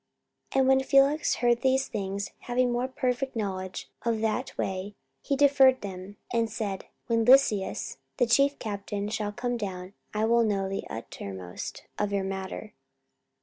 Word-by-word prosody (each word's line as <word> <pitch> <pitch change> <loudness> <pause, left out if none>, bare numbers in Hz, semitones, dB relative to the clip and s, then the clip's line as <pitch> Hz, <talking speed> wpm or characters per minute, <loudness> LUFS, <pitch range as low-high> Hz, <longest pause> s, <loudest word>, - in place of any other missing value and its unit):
44:024:022 270 - +3
And 260 - +3
when 265 0 +5
Felix 275 +3 +4
heard 240 -1 +2
these 265 +1 +2
things, 200 -1 -3
having 245 0 +1
more 245 +1 0
perfect 260 0 -2
knowledge 190 -4 -4
of 230 -2 0
that 225 +4 -1
way, 190 +2 -3 0.3
he 280 - 0
deferred 270 -2 +5
them, 195 0 -7 0.2
and 230 -1 +2
said, 210 -4 -4 0.2
When 230 -2 +2
Lysias 235 -5 +3 0.2
the 245 - +4
chief 275 +4 +3
captain 205 -1 -4
shall 210 -1 -2
come 245 +2 -2
down, 190 -3 -5 0.2
I 215 +1 0
will 235 +1 +4
know 200 -3 0
the 195 0 -4
uttermost 95 -5 -7 0.2
of 205 -1 0
your 200 -1 0
matter. 190 +2 -5
220 Hz, 155 wpm, -28 LUFS, 195-255 Hz, 0.3 s, when